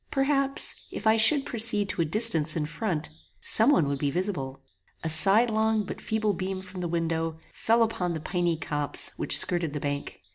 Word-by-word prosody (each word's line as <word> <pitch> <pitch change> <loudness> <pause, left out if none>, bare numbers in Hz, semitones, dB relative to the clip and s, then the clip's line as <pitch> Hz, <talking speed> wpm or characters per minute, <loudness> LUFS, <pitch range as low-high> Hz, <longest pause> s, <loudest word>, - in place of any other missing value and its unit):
Perhaps, 275 0 0 0.2
if - - -9
I 220 0 +4
should 270 +6 +5
proceed 215 -3 +2
to - - -3
a - - 0
distance 165 -4 +3
in 155 -2 -2
front, 160 0 -5 0.3
some 225 +4 +5
one 175 - +2
would 140 -1 -3
be 145 - -1
visible. 135 -6 -4 0.4
A 160 - -3
sidelong 220 +5 +3
but 200 - -9
feeble 215 -1 -2
beam 190 +1 -5
from 185 0 -10
the 175 - -3
window, 165 -1 -3 0.2
fell 230 +1 +1
upon 180 -6 -3
the 160 - -5
piny 175 +1 -2
copse 145 -2 -1
which - - +2
skirted 170 -4 0
the 150 - -4
bank. 145 -6 -6
180 Hz, 185 wpm, -25 LUFS, 160-220 Hz, 0.4 s, should